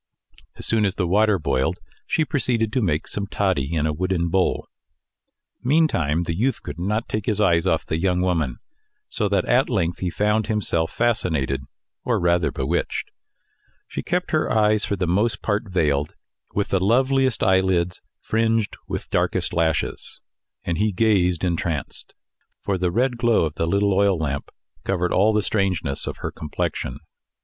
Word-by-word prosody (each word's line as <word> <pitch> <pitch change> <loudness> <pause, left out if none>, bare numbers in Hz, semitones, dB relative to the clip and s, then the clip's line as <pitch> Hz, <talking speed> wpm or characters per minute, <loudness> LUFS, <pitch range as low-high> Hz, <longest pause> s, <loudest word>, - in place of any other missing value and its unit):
As - - -6
soon 110 -1 +2
as 100 -2 +1
the 95 - 0
water 105 +3 +3
boiled, 70 -5 0 0.3
she 160 - +1
proceeded 120 -7 0
to 130 - +1
make 80 -6 0
some 100 -1 -3
toddy 95 -9 0
in 80 -3 0
a 75 - 0
wooden 85 +1 -1
bowl. 95 +2 +1 1.0
Meantime 120 - +2
the 85 -1 -2
youth 125 +8 0
could - - -7
not 105 +6 -1
take 105 -1 -3
his 105 -2 0
eyes 85 -3 +3
off 80 -4 +1
the 80 - -2
young 90 0 +1
woman, 80 -9 0 0.5
so 105 - -1
that 95 -2 +1
at 125 +2 +3
length 85 -4 0
he 90 - -1
found 105 +3 +1
himself 85 -6 0
fascinated, 80 - 0 0.4
or - - +1
rather 85 -1 +2
bewitched. 75 +7 -2 0.8
She - - -4
kept 180 +1 -2
her 155 - +1
eyes 105 -1 +3
for 100 - -1
the 90 -1 -1
most 105 +6 0
part 105 0 -1
veiled 75 -6 0 0.4
with 100 - 0
the 95 -1 +1
loveliest 130 +3 +2
eyelids 95 -2 +2 0.2
fringed 115 -1 0
with - - -4
darkest - - 0
lashes, 80 -2 -1 0.4
and 85 0 -2
he 105 +1 +2
gazed 90 -4 +2
entranced; 85 -4 -3 0.5
for 95 -2 -1
the 90 0 +1
red 120 +6 +1
glow 120 -7 +3
of 75 - -3
the 80 - -1
little 100 +3 +2
oil 100 -1 +3
lamp 70 -3 -3 0.3
covered 90 -2 0
all 105 +4 +4
the 105 -1 +1
strangeness 90 -9 0
of - - -4
her - - -2
complexion. 70 -3 -3
95 Hz, 165 wpm, -23 LUFS, 85-110 Hz, 1.0 s, all